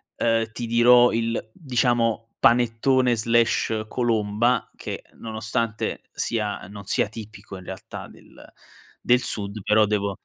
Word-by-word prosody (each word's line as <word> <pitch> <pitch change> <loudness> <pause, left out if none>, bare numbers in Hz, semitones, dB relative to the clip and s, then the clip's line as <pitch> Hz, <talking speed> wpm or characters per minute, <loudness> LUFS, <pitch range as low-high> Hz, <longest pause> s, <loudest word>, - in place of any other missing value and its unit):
ehm, 115 -1 +1
ti 120 - -5
dirò 120 +1 +6
il, 115 -1 -2
diciamo, 120 -5 0
panettone/colomba, 115 -1 +2
che - - -6
nonostante 110 0 -3
sia 105 -3 -3
non 100 -1 -10
sia 100 - +1
tipico 110 -2 -10
in 95 - -11
realtà - - -8
del - - -17 0.6
del 125 0 +4
sud, 105 -3 -4
però 105 +2 +4
devo 100 -1 0
115 Hz, 110 wpm, -24 LUFS, 110-120 Hz, 0.6 s, dirò